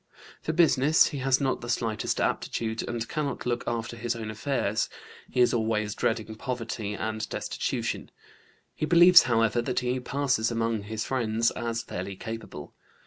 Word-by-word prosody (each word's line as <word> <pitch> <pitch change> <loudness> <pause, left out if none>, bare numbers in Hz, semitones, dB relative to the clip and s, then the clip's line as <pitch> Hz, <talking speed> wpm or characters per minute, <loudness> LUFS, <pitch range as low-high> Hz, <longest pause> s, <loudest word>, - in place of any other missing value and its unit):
For - - -2
business 155 -2 +4
he 145 - -5
has 130 0 +2
not 135 -2 0
the 120 - -7
slightest 115 -2 -1
aptitude, 110 -1 -1
and 115 -1 -3
cannot 145 -4 -3
look 120 0 -1
after 115 0 -2
his 120 +1 -2
own 110 -2 -5
affairs. 110 -2 -1 0.4
He 125 - +1
is 125 - +4
always 110 -2 0
dreading 110 0 -1
poverty 115 -3 -4
and 110 0 -3
destitution. - - -3 0.6
He 155 - -2
believes, 175 +2 +9
however, 115 0 +3
that 125 +1 -1
he 125 +1 -1
passes 130 -3 0
among 115 -3 -1
his 110 0 -3
friends 115 -3 +1
as 115 -1 -3
fairly 95 -1 -5
capable. 115 +4 -7
115 Hz, 155 wpm, -27 LUFS, 110-130 Hz, 0.6 s, believes